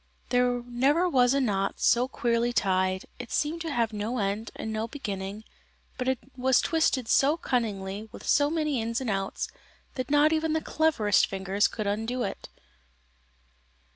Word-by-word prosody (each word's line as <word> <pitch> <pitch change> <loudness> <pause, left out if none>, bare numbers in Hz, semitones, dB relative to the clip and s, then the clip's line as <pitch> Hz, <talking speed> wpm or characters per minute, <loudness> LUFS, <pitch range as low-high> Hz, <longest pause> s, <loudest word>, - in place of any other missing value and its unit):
There 245 -1 +2
never 275 +9 +2
was 255 -5 +3
a - - +3
knot 195 -6 0
so 245 +2 +3
queerly 240 -3 0
tied; 190 -4 +1
it 245 -2 -8
seemed 315 +3 -1
to 325 -1 -3
have 230 -4 0
no 215 +4 -2
end 205 +1 -2
and 220 - -5
no 220 +1 -2
beginning, 205 -5 -5 0.6
but 260 +1 +1 0.2
was 260 0 +3
twisted 305 -7 +1
so 285 +7 +3
cunningly, 215 - -2
with - - -11
so 290 0 +4
many 305 -5 0
ins 230 +1 -2
and 255 -4 -2
outs, 195 0 -2 0.5
that 255 0 -4
not 295 +2 +4
even 315 0 0
the 320 - +2
cleverest 290 -13 +2
fingers 195 +2 0
could 215 - -5
undo 225 +5 -1
it. 195 - -5
240 Hz, 160 wpm, -27 LUFS, 210-275 Hz, 0.6 s, so